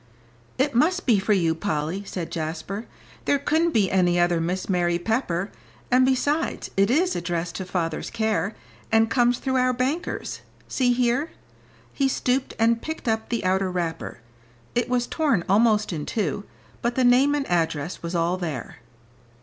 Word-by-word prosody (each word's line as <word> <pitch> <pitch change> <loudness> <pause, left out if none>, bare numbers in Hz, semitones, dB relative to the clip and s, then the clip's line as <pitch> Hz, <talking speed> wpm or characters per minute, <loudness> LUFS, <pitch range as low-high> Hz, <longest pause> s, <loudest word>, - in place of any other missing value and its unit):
"It 275 +2 +1
must 340 +10 +2
be 225 -6 +4
for 200 +2 +2
you, 170 -5 +2
Polly," 165 +1 -2
said 175 -4 -5
Jasper. 165 +6 -4 0.4
"There 285 - +3
couldn't 315 +4 +1
be 210 - +2
any 175 -2 +3
other 175 -1 +2
Miss 180 +3 -2
Mary 175 -2 +1
Pepper, 195 -2 -1 0.4
and 255 +1 +5
besides 285 +5 0
it 195 +1 +3
is 350 +8 +2
addressed 170 0 -2
to 190 - -4
father's 165 -3 -2
care, 220 -2 -1 0.4
and 225 0 +4
comes 245 0 +3
through 265 0 -1
our 255 0 +3
bankers, 265 +7 -2 0.3
see 250 -2 +1
here." 245 +5 +1 0.6
He 275 - +1
stooped, 255 0 0
and 230 0 +3
picked 315 -4 -6
up 220 0 0
the 235 -5 -2
outer 190 +1 +2
wrapper; 165 -8 -4 0.5
it 240 0 0
was 250 -1 +1
torn 280 - +1
almost 210 0 +3
in 150 -3 -4
two, 205 -1 -2 0.4
but 235 0 -1
the 260 - +2
name 260 +4 +5
and 285 -2 -1
address 165 -2 -1
was 170 +1 -4
all 170 +2 +1
there. 155 -9 -5
215 Hz, 165 wpm, -24 LUFS, 175-255 Hz, 0.6 s, and